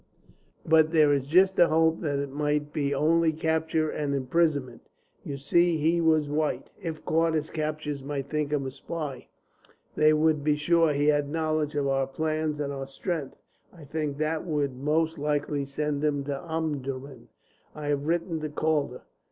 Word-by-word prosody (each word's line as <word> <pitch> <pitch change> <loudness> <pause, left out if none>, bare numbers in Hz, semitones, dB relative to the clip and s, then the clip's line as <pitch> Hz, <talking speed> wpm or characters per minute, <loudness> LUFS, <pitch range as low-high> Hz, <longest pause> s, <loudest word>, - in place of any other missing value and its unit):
But 160 -1 +5
there 155 -3 +5
is 140 -1 -1
just 185 +5 +4
a 175 - +7
hope 160 +1 +2
it 140 -2 -1
might 150 +1 -1
be 140 -2 0
only 160 +3 +3
capture 160 0 0
and 145 -2 -2
imprisonment. 140 -2 0 0.4
You 140 - -5
see 170 +5 +2
he 165 +3 +2
was 155 -2 +3
white. 150 +1 -2
If 160 -3 -6
caught, 165 0 +2
his 155 0 -2
captors 155 -2 -3
might 140 -1 -4
think 150 0 -2
him 145 -2 0
a 130 - -4
spy; 140 -1 -6 0.7
they 155 0 +5
would 155 -1 +2
be 150 0 +3
sure 165 +1 +3
he 145 0 0
had 145 -1 +2
knowledge 155 -1 -1
of 145 -1 0
our 135 -1 +1
plans 155 +1 -2
and 140 -1 -2
our 135 -1 -5
strength. 150 0 -4 0.4
I 170 -4 -14
think 145 -1 -3
that 155 +1 -1
they 170 - -6
would 145 -3 0
most 155 +4 0
likely 145 -1 -1
send 145 +1 -2
him 145 -2 +1
to 140 0 -4
Omdurman. 140 -5 -4 0.5
I 150 -1 -5
have 145 0 -1
written 170 0 0
to 155 0 -4
Calder. 150 -4 -1
150 Hz, 175 wpm, -27 LUFS, 140-160 Hz, 0.7 s, a